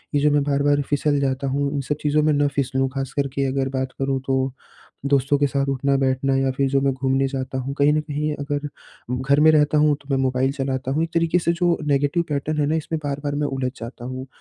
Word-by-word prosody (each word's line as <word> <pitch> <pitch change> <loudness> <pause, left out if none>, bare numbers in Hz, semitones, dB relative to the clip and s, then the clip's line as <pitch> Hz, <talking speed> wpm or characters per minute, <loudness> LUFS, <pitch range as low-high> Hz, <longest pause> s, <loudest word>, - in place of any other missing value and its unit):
ये - - +4
जो 150 - +4
मैं 145 0 +3
बार-बार 145 0 +2
फिसल 145 0 +1
जाता 135 0 -1
हूँ, 140 +1 0
इन 140 - 0
सब 150 +3 -2
चीज़ों 150 +1 +2
में 155 - +3
ना 145 0 +2
फिसलूँ, 135 -1 0
खास 135 -1 -4
कर 140 -1 0
के 140 -1 0
अगर 135 0 -1
बात 130 -1 -2
करूँ 135 0 0
तो, 130 -1 0 0.5
दोस्तों 140 0 +2
के 145 - +3
साथ 140 0 -1
उठना-बैठना 135 0 +1
या 135 0 +1
फिर 135 -1 +2
जो 135 0 +2
मैं 135 0 +2
घूमने 135 +1 +1
जाता 130 -1 -4
हूँ, 135 +2 -4
कहीं 145 +1 +4
न 155 - +2
कहीं 150 0 -2
अगर 145 0 -3 0.5
घर 135 +3 +2
में 155 +1 +7
रहता 150 0 +3
हूँ, 150 0 +4
तो 140 - -21
मैं 135 - +2
मोबाइल 130 +1 +1
चलाता 135 -2 -3
हूँ 155 - +1
एक 165 - -7
तरीके 165 +1 +2
से 170 -1 +1
जो 170 0 +1
नेगेटिव 145 +4 +2
पैटर्न 150 +1 -2
है 145 - +2
ना 155 - +1
इसमें 160 0 -3
बार-बार 145 0 -2
मैं 145 0 0
उलझ 135 -2 -2
जाता 120 +1 -8
हूँ 130 +1 -6
140 Hz, 240 wpm, -22 LUFS, 135-145 Hz, 0.5 s, में